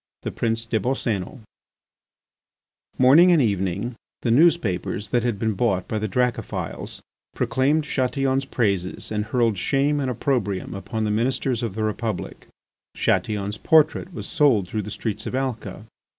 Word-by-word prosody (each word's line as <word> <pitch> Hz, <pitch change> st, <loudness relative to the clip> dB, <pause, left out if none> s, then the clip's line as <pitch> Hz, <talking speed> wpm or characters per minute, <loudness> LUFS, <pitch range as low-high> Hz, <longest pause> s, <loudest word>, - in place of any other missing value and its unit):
V. -, -, -2 dB
THE -, -, -7 dB
PRINCE 115 Hz, -1 st, -1 dB
DES 115 Hz, -1 st, 0 dB
BOSCÉNOS 115 Hz, -1 st, -2 dB, 1.6 s
Morning 150 Hz, +8 st, +7 dB
and 170 Hz, -, +5 dB
evening 100 Hz, 0 st, 0 dB, 0.3 s
the 115 Hz, -, +1 dB
newspapers 115 Hz, -, +2 dB
that 120 Hz, -, +2 dB
had 120 Hz, -3 st, -1 dB
been 110 Hz, +2 st, 0 dB
bought 95 Hz, -4 st, 0 dB
by 110 Hz, -, -2 dB
the 110 Hz, -, -2 dB
Dracophils 125 Hz, +2 st, -2 dB, 0.3 s
proclaimed 145 Hz, +4 st, +1 dB
Chatillon's 135 Hz, -1 st, 0 dB
praises 100 Hz, -9 st, -1 dB
and 105 Hz, -1 st, -1 dB
hurled 115 Hz, -4 st, +1 dB
shame 145 Hz, +4 st, +1 dB
and 135 Hz, -2 st, -1 dB
opprobrium 115 Hz, -6 st, -1 dB
upon 110 Hz, +3 st, -4 dB
the 105 Hz, -, 0 dB
Ministers 125 Hz, +2 st, 0 dB
of 115 Hz, -5 st, -3 dB
the 110 Hz, -, -2 dB
Republic. 110 Hz, -1 st, -3 dB, 0.5 s
Chatillon's 105 Hz, -1 st, 0 dB
portrait 160 Hz, +3 st, +3 dB
was -, -, -7 dB
sold 125 Hz, -, +2 dB
through 110 Hz, +3 st, -2 dB
the 105 Hz, -, -7 dB
streets 110 Hz, 0 st, -4 dB
of -, -, -3 dB
Alca. 115 Hz, -6 st, -4 dB
115 Hz, 150 wpm, -23 LUFS, 105-130 Hz, 1.6 s, Morning